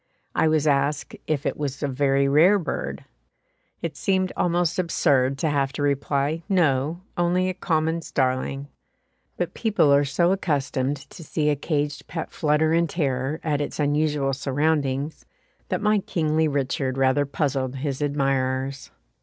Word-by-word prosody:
I - - +2
was 155 -1 +2
asked 145 0 +1
"if 145 -3 -1
it - - 0
was 145 -1 -4
a - - +1
very 140 0 +2
rare 165 +9 +5
bird?" 180 - -4 0.8
It 165 -2 -3
seemed 185 -1 0
almost 175 0 +1
absurd 140 -6 +2
to 160 +2 0
have 140 -2 +1
to 145 - -3
reply, 140 +2 0
"No, 160 -3 +1 0.2
only 180 +2 +2
a - - -2
common 165 -2 0
starling;" 135 0 -1 0.7
but - - -2
people 210 -10 +3
are 140 +1 +5
so 170 +6 +2
accustomed 145 -6 0
to 165 - -10
see 150 0 0
a - - +1
caged 145 0 -2
pet 165 -1 -5
flutter 155 +1 +2
in 170 0 +3
terror 140 -2 -1
at 150 -2 0
its 145 - -4
unusual 145 -1 +1
surroundings, 140 +1 -1 0.5
that - - -1
my 210 0 +3
kingly 160 -4 0
Richard 135 -2 -1
rather 135 +2 +2
puzzled 135 -2 -1
his 135 0 -3
admirers. 135 -1 -1
145 Hz, 150 wpm, -24 LUFS, 135-160 Hz, 0.8 s, rare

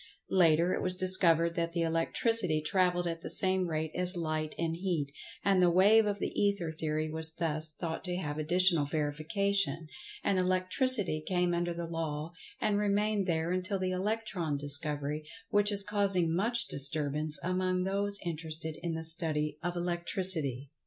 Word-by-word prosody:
Later 170 -1 +3
it - - -2
was 185 0 -1
discovered 170 -3 +2
that 170 0 -2
the 170 -1 -1
Electricity 165 +2 +2
travelled 175 +3 0
at 165 -1 -4
the - - -7
same 185 -1 +2
rate 160 -1 -3
as 180 0 +2
Light 155 -2 -3
and 165 -1 -2
Heat, 170 -6 -3 0.3
and 195 -2 +3
the 180 - +4
Wave 205 +5 +4
of 205 -1 -2
the - - -3
Ether 200 -5 -1
theory 155 0 -3
was 160 0 0
thus 155 -2 0
thought 160 +2 -6
to 180 -1 -3
have 150 -4 -4
additional 170 0 +3
verification, 160 +3 -1 0.4
and 195 -2 +1
Electricity 185 - +3
came 180 +1 0
under 175 0 -1
the 170 0 -5
Law 165 -1 -5 0.3
and 205 -1 0
remained 205 -1 0
there 165 0 -1
until 185 +2 -2
the 185 -1 -2
Electron 185 -5 -2
discovery, 145 +1 0 0.3
which 205 0 +2
is 200 -1 +3
causing 195 -5 0
much 235 +5 0
disturbance, 150 +2 +1
among 185 0 -1
those 200 +1 -1
interested 160 -1 -5
in 170 -2 -3
the 160 - -5
study 155 -2 0
of 175 +1 -3
Electricity. 170 -6 +2
170 Hz, 160 wpm, -30 LUFS, 155-185 Hz, 0.4 s, the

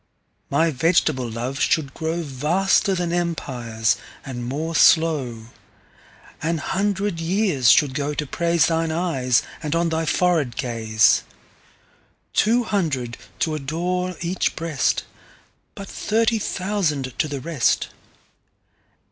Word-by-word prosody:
My 160 +4 +2
vegetable 145 -3 +1
Love 120 +4 -4
should 145 -3 +1
growVaster 165 +5 0
then 175 -1 -1
Empires, 125 -10 -1 0.3
and 120 -2 -5
more 150 +7 -3
slow. 135 -10 +3 0.9
An 165 +1 0
hundred 195 +2 -1
years 170 - +2
should 140 +1 +5
go 145 +1 -2
to 150 - -2
praiseThine 165 +1 +1
Eyes, 140 -8 +1 0.2
and 155 0 -2
on 170 0 +1
thy 160 0 -1
Forehead 160 -10 +1
Gaze.Two 120 - -1
hundred 150 - -1 0.2
to 160 - 0
adore 175 +5 -2
each 175 +2 -1
Breast:But 165 +4 -4
thirty 225 +1 0
thousand 180 -11 -1
to 155 - +2
the 145 -2 -4
rest. 145 -2 0
160 Hz, 105 wpm, -22 LUFS, 130-175 Hz, 0.9 s, should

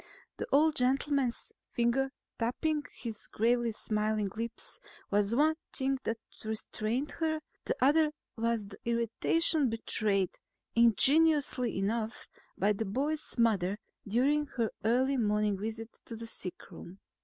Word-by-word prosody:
The - - -4
old 305 +2 +4
gentleman's 265 0 +1 0.2
finger 245 +3 +1 0.3
tapping 295 +6 0
his 225 -3 -6
gravely 235 +1 +1
smiling 215 -1 -1
lips 230 +1 -6 0.3
was 205 +2 +2
one 305 +4 +4 0.2
thing 270 0 0
that 225 - -1 0.3
restrained 220 +4 -2
her; 315 -1 +1 0.3
the - - 0
other 300 +3 +4 0.2
was 230 -2 0
the - - -12
irritation 235 +6 +2
betrayed, 210 -4 0 0.3
ingenuously 265 +1 +4
enough, 220 +3 -2 0.3
by 205 +2 +3
the 220 +2 -3
boy's 290 +9 -2
mother 205 -5 +2 0.3
during 280 +8 +2
her 230 -5 -1
early 260 +5 +2
morning 210 -2 +2
visit 225 +2 -6
to 230 - -7
the 230 +1 -6
sickroom. 185 -3 -6
235 Hz, 120 wpm, -31 LUFS, 215-275 Hz, 0.3 s, old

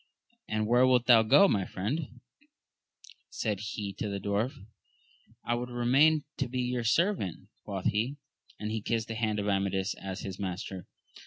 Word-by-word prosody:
And 110 0 -1
where 120 +3 +4
wilt 125 -1 +3
thou 120 -3 +7
go, 110 - +6
my 100 - +1
friend? 120 - -4 1.1
said 105 -4 -2
he 105 -1 -4
to 105 - -2
the 100 0 -3
dwarf. 105 +8 -1 0.9
I 120 - +1
would 120 +1 -3
remain 135 +6 +3 0.2
and 135 -4 -1
be 125 +1 -2
your 125 -1 -1
servant, 165 - 0 0.2
quoth 95 -2 -5
he, 115 +7 0 0.4
and 105 0 -3
he 110 0 -2
kissed 115 +1 -2
the - - -2
hand 110 -2 -1
of 105 0 -2
Amadis 95 0 0
as 95 -1 -6
his 95 -1 -6
master. 95 -1 -5
110 Hz, 165 wpm, -30 LUFS, 100-125 Hz, 1.1 s, thou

